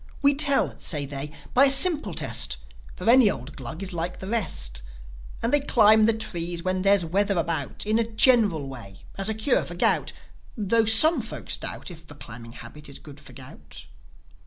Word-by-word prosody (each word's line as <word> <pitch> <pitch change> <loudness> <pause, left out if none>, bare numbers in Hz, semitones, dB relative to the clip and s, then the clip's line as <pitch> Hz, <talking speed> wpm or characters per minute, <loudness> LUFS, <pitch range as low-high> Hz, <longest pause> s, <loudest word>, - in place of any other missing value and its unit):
"We 280 0 +5
tell," 280 -1 +3
say 145 -4 0
they, 140 +1 -7 0.2
"by 265 +3 +6
a 270 - +4
simple 275 - +2
test; - - -1 0.4
For 180 - -8
any 240 -2 +6
old 135 -4 -7
Glug 135 +8 -7
is 190 -1 -5
like 175 +1 -4
the - - -9
rest. 185 - -3 0.6
And 230 - -1
they 290 - +6
climb 220 -5 +4
the - - +5
trees 175 -5 -4
when 185 0 -2
there's 195 -2 +3
weather 200 +3 0
about, 170 +3 -3
In 215 +2 +1
a - - +2
general 215 - +3
way, 115 -8 -12
as 195 +2 0
a 220 - -1
cure 220 +5 +2
for 175 - -8
gout; 175 - +1 0.5
Tho' 225 +2 +2
some 265 +10 +5
folks - - -5
doubt - - -5
If 165 -2 -14
the 145 - -12
climbing 115 -3 -11
habit 150 +3 -10
is 140 - -9
good 145 -2 -14
for - - -15
gout." 75 - -13
190 Hz, 190 wpm, -24 LUFS, 145-225 Hz, 0.6 s, by